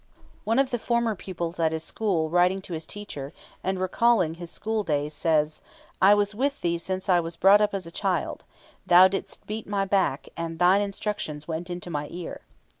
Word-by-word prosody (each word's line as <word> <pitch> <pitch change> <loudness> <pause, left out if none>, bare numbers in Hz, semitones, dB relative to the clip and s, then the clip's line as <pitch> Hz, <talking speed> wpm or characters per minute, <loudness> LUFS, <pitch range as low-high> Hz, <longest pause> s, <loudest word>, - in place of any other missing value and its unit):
One 225 +3 +1
of 270 0 +2
the 240 - -1
former 235 -1 +1
pupils 175 -3 -5
at 160 -1 +2
his 160 0 -3
school 170 -8 -1
writing 180 +2 +3
to 185 - -7
his 160 0 -5
teacher, 160 -9 -7 0.3
and 190 0 -1
recalling 185 -2 +2
his 170 0 -8
school 220 +2 -2
days, 150 -3 -1
says: 155 -1 0 0.4
"I 200 +2 +7
was 205 0 +1
with 275 +6 -1
thee 170 -1 0
since 185 +2 -4
I 180 -2 +5
was 165 0 -4
brought 195 +4 +6
up 210 -1 +1
as 190 -3 -3
a 165 - -9
child; 185 -2 -2 0.4
thou 180 +2 +7
didst 195 +1 -5
beat 215 +1 -5
my 200 -1 0
back, 190 -8 0
and 165 -1 -4
thine 180 +3 +5
instructions 200 -7 -4
went 170 +2 -4
into 175 0 -5
my 145 -1 -3
ear." 175 -1 -7
180 Hz, 195 wpm, -26 LUFS, 165-205 Hz, 0.4 s, I